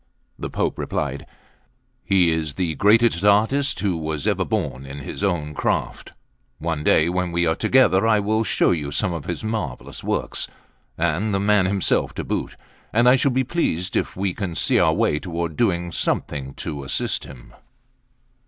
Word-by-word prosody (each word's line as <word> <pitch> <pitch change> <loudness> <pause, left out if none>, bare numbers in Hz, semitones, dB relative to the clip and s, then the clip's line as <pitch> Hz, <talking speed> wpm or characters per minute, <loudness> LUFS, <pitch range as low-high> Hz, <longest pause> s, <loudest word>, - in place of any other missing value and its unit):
The - - -4
Pope - - -2
replied: - - -3 0.8
"He 90 -4 +3
is 80 -3 -2
the 85 -1 -1
greatest 105 -1 +3
artist 110 +5 +3
who 100 -4 0
was 80 -2 -3
ever - - +1
born 65 +2 -2
in 70 +1 -8
his 70 - -7
own 80 -6 -1
craft; - - -2 0.4
one 80 -2 -3
day, 80 +1 +4
when 90 0 -1
we 85 0 +1
are 80 - +3
together, 110 -5 +3
I 110 -2 +4
will 110 +2 +1
show 110 - +2
you 75 -4 -2
some 95 +4 0
of 80 -4 -5
his - - -4
marvellous 110 - -4
works, - - -2 0.5
and 85 +6 0
the - - +1
man 100 -1 +3
himself 95 0 0
to - - -3
boot; - - -3 0.4
and 120 +3 +3
I 125 - +7
shall 140 +2 +2
be 130 0 +1
pleased 95 - -1
if - - -1
we 95 -1 -1
can 90 -5 -4
see - - +2
our - - +4
way 75 - +1
toward 85 -2 -4
doing 85 -5 0
something 70 -4 -2
to 70 -3 -5
assist 65 - -1
him." 65 -2 -13
90 Hz, 175 wpm, -22 LUFS, 80-105 Hz, 0.8 s, I